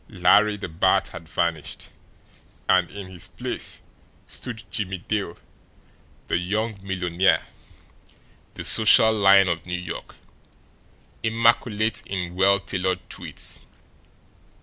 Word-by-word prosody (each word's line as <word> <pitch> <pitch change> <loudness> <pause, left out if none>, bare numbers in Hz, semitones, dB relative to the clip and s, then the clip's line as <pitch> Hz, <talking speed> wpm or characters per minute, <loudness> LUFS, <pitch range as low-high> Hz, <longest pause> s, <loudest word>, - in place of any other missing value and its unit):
Larry 105 +2 +3
the 100 - -6
Bat 80 -1 +1
had 80 - -11
vanished, 85 -3 -3 0.8
and 90 -2 +3
in 100 0 -8
his 95 -2 -7
place - - -4 0.4
stood 120 -2 -6
Jimmie 95 -3 -3
Dale, 105 -2 -2 0.9
the - - 0
young 105 +4 -2
millionaire, 90 -2 +1 1.1
the - - -6
social 110 0 +6
lion 100 -2 +5
of 85 0 -2
New 90 0 -3
York, 90 - -8 1.1
immaculate 110 -1 +1
in 90 -3 -4
well 100 +2 +4
tailored 95 -1 -2
tweeds. - - -6
95 Hz, 105 wpm, -24 LUFS, 90-105 Hz, 1.1 s, social